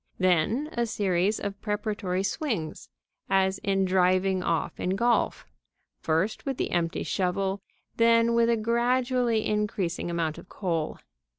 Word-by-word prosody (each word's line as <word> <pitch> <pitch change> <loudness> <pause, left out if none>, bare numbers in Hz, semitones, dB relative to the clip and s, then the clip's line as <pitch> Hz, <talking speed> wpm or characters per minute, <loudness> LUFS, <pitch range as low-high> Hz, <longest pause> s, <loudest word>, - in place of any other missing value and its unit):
Then 185 - +2
a 235 0 -1
series 200 -1 +1
of 200 0 -5
preparatory 205 -3 -2
swings, 200 - -3 0.4
as 190 0 +2
in 195 -2 +1
driving 185 0 +2
off 165 -2 -1
in 185 +1 0
golf, 235 +4 +1 0.5
first 165 +7 0
with 270 -2 -3
the - - -2
empty 170 0 0
shovel, 190 +1 -1 0.4
then 230 0 +4
with 235 0 +3
a 235 - +3
gradually 240 0 +1
increasing 205 -5 -1
amount 165 -2 -2
of - - -15
coal. 165 -5 -2
195 Hz, 130 wpm, -27 LUFS, 180-230 Hz, 0.5 s, then